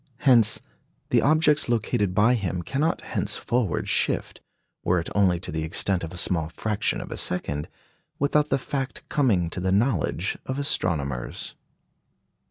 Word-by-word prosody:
Hence, 115 Hz, -6 st, +5 dB, 0.5 s
the -, -, +4 dB
objects 150 Hz, -2 st, +3 dB
located 110 Hz, -4 st, 0 dB
by 115 Hz, +5 st, +4 dB
him 95 Hz, -6 st, -2 dB
cannot 150 Hz, -, -1 dB
henceforward 120 Hz, -9 st, -1 dB
shift, -, -, 0 dB, 0.4 s
were 90 Hz, 0 st, +2 dB
it 85 Hz, -, -5 dB
only 95 Hz, -4 st, +3 dB
to 95 Hz, -, -6 dB
the 80 Hz, 0 st, -2 dB
extent 90 Hz, +3 st, 0 dB
of 80 Hz, -, -5 dB
a 90 Hz, -, -8 dB
small 80 Hz, -3 st, 0 dB
fraction 105 Hz, +4 st, -1 dB
of -, -, -9 dB
a -, -, -5 dB
second, 75 Hz, -5 st, -1 dB, 0.5 s
without 150 Hz, +1 st, +1 dB
the -, -, +2 dB
fact 135 Hz, 0 st, -5 dB
coming 110 Hz, -, +2 dB
to -, -, -3 dB
the 95 Hz, +1 st, 0 dB
knowledge 100 Hz, -, 0 dB
of 130 Hz, -, -3 dB
astronomers. 75 Hz, -, -1 dB
100 Hz, 150 wpm, -25 LUFS, 85-130 Hz, 0.5 s, Hence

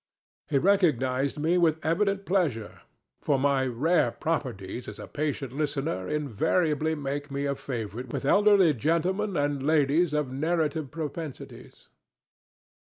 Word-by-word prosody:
He -, -, +1 dB
recognized 140 Hz, -7 st, +2 dB
me 165 Hz, +4 st, +2 dB
with 160 Hz, -2 st, +1 dB
evident 195 Hz, +4 st, +1 dB
pleasure, 155 Hz, -, -1 dB, 0.4 s
for 140 Hz, -, +1 dB
my 135 Hz, -1 st, +2 dB
rare 155 Hz, +8 st, +2 dB
properties 125 Hz, -, -4 dB
as -, -, -7 dB
a -, -, -8 dB
patient 145 Hz, -4 st, -3 dB
listener 140 Hz, -, -2 dB
invariably 150 Hz, -, 0 dB
make 145 Hz, 0 st, -4 dB
me 140 Hz, 0 st, -3 dB
a 140 Hz, -, 0 dB
favorite 125 Hz, -3 st, -5 dB
with -, -, -3 dB
elderly 200 Hz, -1 st, +5 dB
gentlemen 175 Hz, -, 0 dB
and 145 Hz, -1 st, 0 dB
ladies 155 Hz, +3 st, +2 dB
of 150 Hz, -4 st, -1 dB
narrative 155 Hz, +1 st, -1 dB
propensites. 155 Hz, -1 st, -8 dB
150 Hz, 125 wpm, -27 LUFS, 135-165 Hz, 0.4 s, elderly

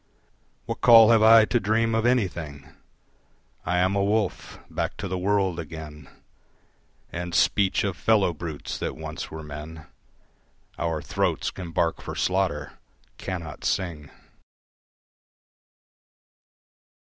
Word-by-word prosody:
What -, -, -5 dB
call 115 Hz, -1 st, +8 dB
have 115 Hz, -2 st, +5 dB
I 110 Hz, 0 st, +8 dB
to 120 Hz, -, +1 dB
dream 115 Hz, +2 st, +1 dB
of 110 Hz, +1 st, +2 dB
anything? 85 Hz, -, -1 dB, 1.0 s
I 90 Hz, -, +1 dB
am 95 Hz, +2 st, +2 dB
a 100 Hz, -, +1 dB
wolf. 105 Hz, -1 st, -1 dB
Back -, -, -3 dB
to -, -, -4 dB
the 95 Hz, -, -3 dB
world 95 Hz, -2 st, 0 dB
again, 75 Hz, -2 st, -9 dB, 1.0 s
And 85 Hz, 0 st, -5 dB
speech 100 Hz, -2 st, +2 dB
of 100 Hz, -4 st, -2 dB
fellow 100 Hz, -3 st, +2 dB
brutes 80 Hz, -2 st, -6 dB
that -, -, -3 dB
once -, -, -7 dB
were 80 Hz, 0 st, -8 dB
men 75 Hz, +1 st, -9 dB, 0.9 s
Our 80 Hz, -1 st, -2 dB
throats -, -, -1 dB
can 90 Hz, -3 st, -8 dB
bark 85 Hz, 0 st, 0 dB
for -, -, -7 dB
slaughter: 95 Hz, -6 st, -1 dB, 0.4 s
cannot 85 Hz, -4 st, -6 dB
sing. 80 Hz, -6 st, -2 dB
90 Hz, 120 wpm, -25 LUFS, 80-105 Hz, 1.0 s, call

